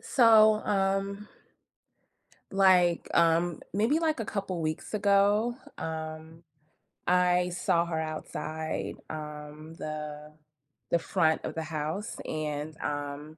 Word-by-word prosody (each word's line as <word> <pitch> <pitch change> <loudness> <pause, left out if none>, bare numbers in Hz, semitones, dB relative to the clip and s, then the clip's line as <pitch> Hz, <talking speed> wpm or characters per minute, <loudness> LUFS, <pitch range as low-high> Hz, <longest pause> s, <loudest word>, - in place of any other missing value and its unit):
so, 220 -3 +5
um, 195 +1 0 1.3
like, 185 -3 +4
um, 170 0 +3 0.2
maybe, 225 +10 +2
like, 315 -6 0
a - - -1
couple 195 -5 -3
weeks 155 +6 -3
ago, 205 +3 +3 0.2
um, 160 +1 -6 0.6
I 180 0 +3
saw 170 -1 +1
her 160 -2 -2
outside, 155 0 -4
um, 150 0 -8
the 150 0 -6 0.6
the 170 - +4
front 160 -3 +1
of - - -5
the 160 - -2
house, 160 +6 -4
and, 155 0 -4
um, 145 +1 -5
170 Hz, 110 wpm, -29 LUFS, 155-195 Hz, 1.3 s, so